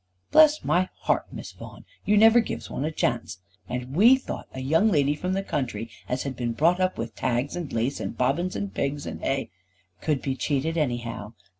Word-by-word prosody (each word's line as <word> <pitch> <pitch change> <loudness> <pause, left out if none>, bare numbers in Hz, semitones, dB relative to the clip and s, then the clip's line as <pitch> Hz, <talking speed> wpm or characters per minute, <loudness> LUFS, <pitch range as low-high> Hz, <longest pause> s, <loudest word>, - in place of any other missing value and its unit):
"Bless 310 -1 +6
my 185 +1 +2
heart, - - 0
Miss - - -8
Vaughan. - - -12 0.2
You 210 - +3
never 225 +2 +7
gives 230 - -4
one 140 - -2
a 155 - -1
chance. 120 - -1 0.3
And 125 +2 -4
we 230 +9 +7
thought 265 - -6
a 130 - -7
young 165 +11 +3
lady 145 -4 +3
from 180 +5 -2
the 195 +1 -1
country 120 - -3 0.2
as 125 +1 -1
had 135 -2 -4
been 120 -1 -2
brought 170 +8 +3
up 185 0 +1
with 115 - -4
tags, 125 +5 -1
and 170 -5 -5
lace, 120 +5 -1
and - - -5
bobbin, 140 +8 +1
and 200 -1 -4
pigs, 145 +1 -2
and - - -6
hay 135 -7 -1 0.2
" 90 -1 -38
"Could 150 -4 0
be 135 -1 -1
cheated 145 +4 -1
anyhow. 120 -7 -2
140 Hz, 205 wpm, -26 LUFS, 125-180 Hz, 0.3 s, never